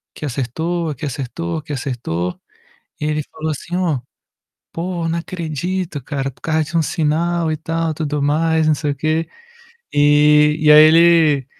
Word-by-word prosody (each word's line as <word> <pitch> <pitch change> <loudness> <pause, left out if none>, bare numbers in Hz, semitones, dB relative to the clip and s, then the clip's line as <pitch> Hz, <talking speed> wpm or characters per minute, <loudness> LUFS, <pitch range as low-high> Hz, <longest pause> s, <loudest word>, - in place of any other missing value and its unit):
aqui - - -6
acertou, 160 +6 -2
aqui 150 +1 -5
acertou, 150 +5 -4
aqui 150 -1 -6
acertou". 115 -10 -3 0.6
E 150 - -3
ele 150 0 0
falou 155 - -4
assim: 170 +4 -5
"Ó, 170 -7 0 0.7
pô, 170 0 -3
não 165 +1 -1
acredito, 170 -1 -4
cara. 135 0 -3
Por 125 - -24
causa 160 -1 0
de 155 +3 -5
1 165 - +3
sinal 165 +2 0
e - - -1
tal, 165 +1 -2
tudo 150 -2 -2
mais, 160 +2 +1
não 155 - +4
sei 150 0 -2
o - - -5
quê". 155 +3 -1 0.7
E 150 +1 +4
e 155 -1 +4
aí 150 0 +9
ele, 160 -4 +5
155 Hz, 165 wpm, -19 LUFS, 145-165 Hz, 0.7 s, aí